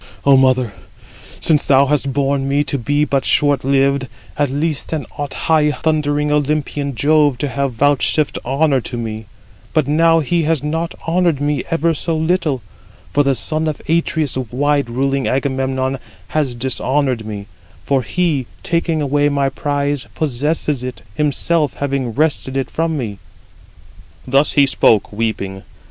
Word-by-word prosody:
"O 140 -1 +6
mother, 130 -4 +3 0.7
since 155 -3 +3
thou 135 0 +5
hast 140 -1 +1
borne 135 0 0
me, 140 +1 +2
to 140 -1 -2
be 145 +5 +1
but 135 -1 0
short 145 -3 +2
lived, 135 0 +2 0.3
at 145 -2 +1
least 145 +2 -2
then 155 -3 -3
ought 145 -3 -4
high 155 -2 +3
thundering 150 -2 0
Olympian 145 -1 -1
Jove 145 0 +3
to 145 - -2
have 140 0 -2
vouchsafed 145 +3 +1
honour 135 +1 +1
to 120 - -5
me; 110 -2 -5 0.5
but 155 -4 +2
now 165 +2 +4
he 170 +3 0
has 155 -2 0
not 165 +3 -2
honoured 170 -3 +2
me 145 -2 -1
ever 165 +1 +1
so 160 +1 -2
little; 160 -5 0 0.5
for 145 - +4
the 140 -2 +2
son 155 +4 0
of 155 - -2
Atreus, 160 -2 0
wide 140 +1 +1
ruling 135 +2 0
Agamemnon, 130 0 -1 0.3
has 145 -6 -1
dishonoured 130 0 -1
me; 105 -2 -6 0.4
for 135 -2 +2
he, 150 -3 -1 0.2
taking 165 -2 0
away 145 +1 +2
my 140 -1 +1
prize, 145 0 -2
possesses 150 -1 0
it, 125 0 -6
himself 150 +2 +1
having 140 -3 -2
wrested 140 -3 0
it 135 -2 -2
[from 160 -1 -1
me]." 105 -7 -4 1.1
Thus 135 +3 +2
he 145 - +5
spoke, 110 -6 +2
weeping. 105 -3 -3
140 Hz, 150 wpm, -18 LUFS, 130-150 Hz, 1.1 s, O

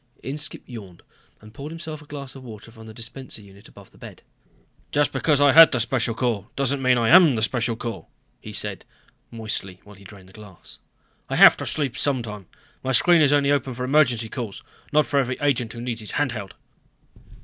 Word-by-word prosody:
Inskipp 145 +3 -5
yawned 100 -8 -11 0.4
and 110 0 -15
poured 140 +6 -8
himself 160 -2 -7
a 150 - -17
glass 140 -2 -8
of 135 - -12
water 110 -2 -11
from 110 -1 -14
the - - -10
dispenser 115 +1 -6
unit 100 0 -16
above 100 -1 -17
the - - -22
bed. - - -12 0.7
"Just 145 0 +1
because 150 -3 +1
I 145 -1 +5
head 165 +3 +9
the 125 - 0
Special 120 -1 -1
Corps, 115 -5 -2
doesn't 140 0 0
mean 130 -1 +3
that 120 - 0
I 115 - +1
am 170 -6 +7
the 110 - -1
Special 115 0 -1
Corps," 115 0 -7 0.3
he - - -9
said - - -3 0.5
moistly 105 -5 -5
while 105 - -15
he 100 - -17
drained 95 -1 -14
the - - -19
glass. 105 -4 -14 0.5
"I - - -2
have - - +8
to - - -5
sleep 140 -5 -2
sometime. 115 - -2 0.4
My 130 0 -1
screen 170 +6 +5
is 145 -2 +4
open 145 -1 +3
only 145 - +2
for 125 - -5
emergency 125 -4 +2
calls, 110 -4 -6 0.3
not 150 0 +3
for 140 - 0
every 130 -1 -1
agent 125 -6 0
who 115 - -8
needs 120 -2 -4
his 105 - -7
hand 145 -3 +1
held." 100 -5 -7
125 Hz, 210 wpm, -23 LUFS, 110-140 Hz, 0.7 s, head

